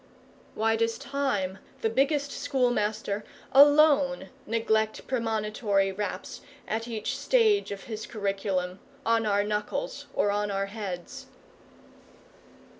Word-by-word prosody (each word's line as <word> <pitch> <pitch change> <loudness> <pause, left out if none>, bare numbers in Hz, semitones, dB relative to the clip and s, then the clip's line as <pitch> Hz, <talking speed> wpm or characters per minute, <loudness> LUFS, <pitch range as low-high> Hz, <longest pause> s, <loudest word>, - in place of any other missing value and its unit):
Why 225 +1 +2
does 230 0 0
Time, 205 -10 -2 0.2
the 225 - +2
biggest 280 +3 +1
Schoolmaster, 215 -6 0 0.3
alone 285 -4 +5 0.2
neglect 220 -1 0
premonitory 215 -4 0
raps, 195 -1 -5 0.3
at 225 +2 -2
each 225 -3 -3
stage 440 - +3
of 200 -1 -6
his 220 -2 -6
curriculum, 195 -3 -2 0.3
on 225 -1 +2
our 205 0 +2
knuckles 210 - -3
or 205 - +2
our 200 -1 0
heads? 195 -4 -6
220 Hz, 105 wpm, -28 LUFS, 200-255 Hz, 0.3 s, alone